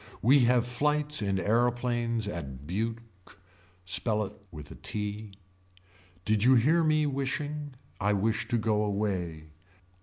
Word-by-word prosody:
We 135 +6 +6
have 120 0 +3
flights 150 +4 0
in 100 -2 0
aeroplanes 120 +1 0
at 70 -8 -6
Buke. 115 +7 -2 0.8
Spell 105 +4 0
it 100 +2 -10
with 75 -4 -10
a - - -9
t. 105 0 -4 0.9
Did 105 0 +2
you 130 +2 +6
hear 155 +8 +4
me 155 -1 +3
wishing. 145 +1 -3 0.2
I 105 +1 +2
wish 105 +2 0
to 120 - +1
go 105 -1 +1
away. 90 -7 -2
110 Hz, 130 wpm, -29 LUFS, 100-130 Hz, 0.9 s, We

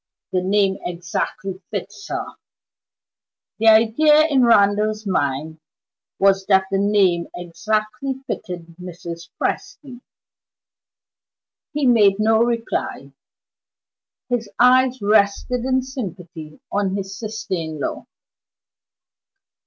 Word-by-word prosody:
The 185 - +1
name 195 0 +1
exactly 180 +3 -4
fits 405 - -6
her!" - - -3 1.3
The 225 - +2
idea 235 +8 +5
in 275 -5 +3
Randal's 215 -1 +3
mind 155 -3 -2 0.6
was 195 -1 +3
that 190 -1 +4
the 195 - +1
name 195 -4 +2
exactly 215 +9 -2
fitted 170 -7 -6
Mrs. 170 -1 -8
Presty. 255 -5 -4 1.7
He 295 -1 -1
made 215 -6 +5
no 220 +1 +3
reply; 235 -1 -2 1.2
his 240 -4 -2
eyes 255 +1 +4
rested 210 +4 +2
in 260 0 +1
sympathy 180 - -8
on 200 -1 0
his 195 -1 -5
sister 215 -1 -5
in 160 -3 -3
law. - - -4
205 Hz, 100 wpm, -21 LUFS, 180-235 Hz, 1.7 s, idea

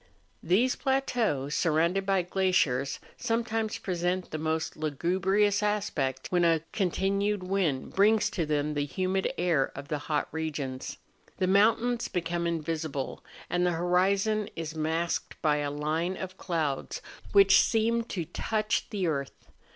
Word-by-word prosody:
These 220 +10 +2
plateaux, 245 - 0
surrounded 170 +5 +1
by 195 -2 +2
glaciers, 170 -8 +1 0.2
some¬ 230 -1 0
times 220 -1 -2
present 180 0 -2
the 155 - -3
most 160 +1 -1
lugubrious 190 +7 +1
aspect, 170 -11 -1
when 175 -1 +3
a 165 -2 +3
continued 200 +1 0
wind 180 -8 -1
brings 210 +2 +4
to 165 -4 -2
them 150 0 0
the 145 -1 0
humid 185 +4 -1
air 165 -6 +1
of 140 +1 -8
the 150 - -1
hot 150 0 -1
regions. 145 -5 -4 0.4
The 185 - +1
mountains 225 +5 +3
become 170 -1 -2
invisible, 160 -4 -3 0.2
and 175 0 0
the 180 -1 +2
horizon 195 +5 +1
is 160 -2 -4
masked 160 +2 -2
by 150 -2 +3
a 145 -1 -1
line 155 +5 -1
of 185 0 -6
clouds 160 -8 -2 0.3
which 195 -1 +7
seem 230 +1 +1
to 180 -8 -4
touch 215 +6 -1
the 200 -4 -2
earth. 140 -4 -4
175 Hz, 140 wpm, -28 LUFS, 155-200 Hz, 0.4 s, which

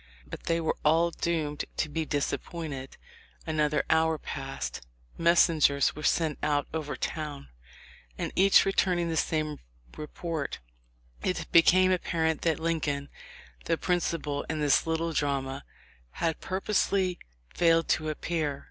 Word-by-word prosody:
But - - -9
they 165 0 +1
were 160 - 0
all 165 +3 +4
doomed 155 -4 -2
to - - 0
disappointment. 150 -2 -3 0.5
Another 150 -2 +1
hour 160 0 +3
passed; 135 - -5 0.3
messengers 165 -4 +4
were 150 - -7
sent 155 0 +1
out 145 -1 +1
over 155 -2 -3
town, 150 - -5 0.7
and - - -3
each 195 +1 +6
returning 180 -3 +1
with 160 -1 +1
the - - +3
same 155 -2 -2 0.4
report, 155 0 -4 0.6
it 185 - -1
became 185 +2 +6
apparent 160 -3 0
that 165 -2 +1
Lincoln, 150 -4 -1 0.6
the 165 - +1
principal 165 -5 -1
in 160 -1 -2
this 145 +1 +3
little 165 0 -1
drama, 140 -2 -1 0.5
had 165 -1 -2
purposely 190 -1 0 0.3
failed 165 -1 +3
to 155 0 +1
appear 155 -2 -2
160 Hz, 125 wpm, -28 LUFS, 150-170 Hz, 0.7 s, each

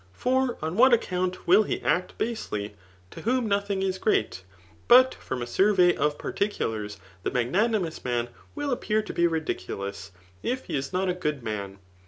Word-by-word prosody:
For 255 - 0
on 160 +2 -2
vAi/t 255 +2 +7
•aocount 185 -3 -3
will 190 +5 +6
lie 215 - -2
.act 180 0 0
^asely9 105 - -3 0.4
to - - -9
whom 245 +1 +1
nothing 200 -1 0
is 190 -1 -1
great 110 - 0 0.5
Jfot 255 +2 +8
.fiom 125 -2 -5
a - - -3
sufvey 180 - +4
#f 150 0 +1
particidars, 110 - -2 0.2
the - - -1
magnanimous 175 - 0
man 120 -1 -1 0.3
will 290 -1 -2
appear 215 -3 0
to - - -7
be 170 - +3
ri^eulous, 100 - -4 0.3
if 255 +1 -2
he - - -4
is 135 -1 -3
not 185 +1 0
a 180 - +1
good 150 -7 -3
man. 100 -3 -4
180 Hz, 170 wpm, -26 LUFS, -, 0.5 s, Jfot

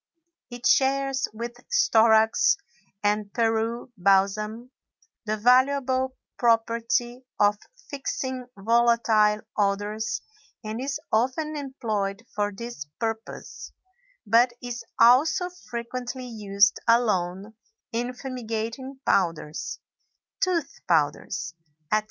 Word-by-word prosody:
It 245 -1 -8
shares 270 0 +2
with 235 +2 -6
storax 220 - +4 0.5
and 205 0 0
Peru 230 +1 0
balsam 210 +5 +1 0.6
the 215 +1 0
valuable 260 +2 +3 0.2
property 235 +1 +1 0.2
of 205 0 +3 0.3
fixing 260 -2 -4
volatile 225 -1 +3
odors 205 +1 -1 0.4
and 220 +2 -4
is 275 +2 -2
often 260 +7 0
employed 230 -7 -3
for 205 0 0
this 235 -5 -7 0.2
purpose, 225 -1 -5 0.5
but 235 +3 +4
is 245 -1 -6 0.2
also 275 +10 +5 0.2
frequently 245 +2 -5
used 205 -3 +2
alone 205 -4 +1 0.4
in 245 +2 -2
fumigating 250 +1 -5
powders, 165 -5 0 0.6
tooth 360 -6 -1
powders, 160 +1 0 0.4
etc. 215 - +4
230 Hz, 90 wpm, -26 LUFS, 210-255 Hz, 0.6 s, also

